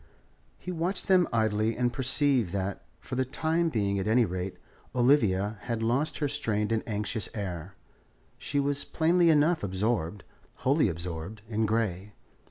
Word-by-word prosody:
He 180 - -6
watched 175 +3 -2
them 185 -2 +5
idly 110 0 +1
and 120 0 +1
perceived 130 - +2
that, 100 0 -2 0.2
for - - -10
the 130 +1 +2
time 160 +6 0
being 100 -7 0
at 95 - -2
any 115 +2 +4
rate, 90 0 -4 0.4
Olivia 110 -6 +3
had 115 -2 -2
lost 125 +7 0
her 145 - 0
strained 115 -7 -1
and 110 -1 +1
anxious 105 -1 -2
air. 95 -2 -5 0.6
She 145 - -1
was 140 0 0
plainly 170 +1 +3
enough 160 +2 +4
absorbed, 100 -2 -1 0.4
wholly 140 -3 +4
absorbed, 85 +4 -6
in 110 0 0
Grey. 105 -3 -1
115 Hz, 150 wpm, -28 LUFS, 100-140 Hz, 0.6 s, them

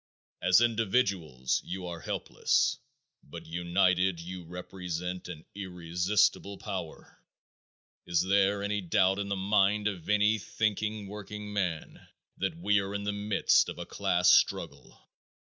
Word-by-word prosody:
As 95 +4 +5
individuals 100 - +1
you 90 +1 -5
are 85 -1 -5
helpless, - - 0 0.4
but - - -10
united 90 +1 +1
you 90 +1 -7
represent 90 +1 -5
an 80 -3 -9
irresistible 95 +2 0
power. 95 -6 -7 0.9
Is 85 -1 +2
there 100 +1 +2
any 105 0 -1
doubt 95 +2 +2
in 100 0 -3
the 100 - 0
mind 100 +1 +2
of 95 -4 -5
any 105 +1 +3
thinking 105 0 -2
workingman 105 -4 -4 0.4
that 95 - -2
we 105 -11 +2
are 100 +1 -4
in 100 - -3
the 105 0 -1
midst 105 +1 +2
of - - -7
a - - -6
class - - +2
struggle? - - +1
95 Hz, 130 wpm, -29 LUFS, 90-105 Hz, 0.9 s, As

